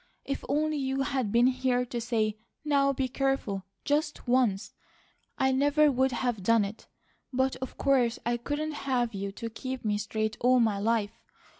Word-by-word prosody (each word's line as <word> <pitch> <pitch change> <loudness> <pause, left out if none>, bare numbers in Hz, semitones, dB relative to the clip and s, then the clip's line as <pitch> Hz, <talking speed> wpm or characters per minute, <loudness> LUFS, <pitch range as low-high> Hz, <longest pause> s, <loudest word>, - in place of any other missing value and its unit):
If 275 - -3
only 305 +2 +1
you 270 -1 -1
had 260 -7 -1
been 235 +2 +4
here 255 -1 +1
to 240 -1 -4
say, 220 -2 -1 0.3
'Now 280 -2 +3
be 265 -1 -1
careful,' 255 -8 -1 0.2
just 295 -1 -1
once, 240 -6 +1 0.6
I 265 0 +2
never 290 +3 +4
would 260 0 +2
have 240 -4 -1
done 225 +2 +3
it; 205 +3 -9 0.4
but 260 0 +1
of 260 0 -7
course 250 -4 +2
I 240 0 +1
couldn't 290 +5 -3 0.2
have 245 -3 +1
you 195 0 -4
to 230 - -5
keep 260 +2 -6
me 210 -1 +1
straight 220 0 -2
all 250 +1 +4
my 220 -4 +2
life. 225 0 0
250 Hz, 170 wpm, -28 LUFS, 225-270 Hz, 0.6 s, been